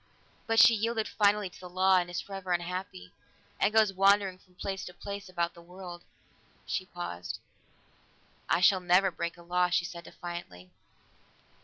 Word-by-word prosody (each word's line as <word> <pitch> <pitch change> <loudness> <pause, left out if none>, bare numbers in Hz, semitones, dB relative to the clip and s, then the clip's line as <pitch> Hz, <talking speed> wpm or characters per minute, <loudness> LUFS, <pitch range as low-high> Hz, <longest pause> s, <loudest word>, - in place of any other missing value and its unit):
But 225 0 +3
she 235 - +9
yielded 225 0 0
finally 205 -1 +2
to 180 - -14
the 180 - -9
law, 185 +1 +4
and 175 -1 0
is 175 - -3
forever 195 -2 -4
unhappy, 175 - -4 0.5
and 200 - +3
goes 215 -2 +4
wandering 195 -1 +3
from 180 -1 -27
place 190 +1 -4
to 180 - -10
place 200 -1 -7
about 175 -1 -1
the 170 - -14
world." 175 0 -10 0.6
She - - -3
paused. 85 +1 -5 1.1
"I - - +3
shall 185 +1 +6
never 180 +2 +4
break 170 0 -4
a 170 - -14
law," 180 +1 +1
she 175 0 +1
said 170 -1 -8
defiantly. 95 - -8
180 Hz, 165 wpm, -30 LUFS, 175-195 Hz, 1.1 s, she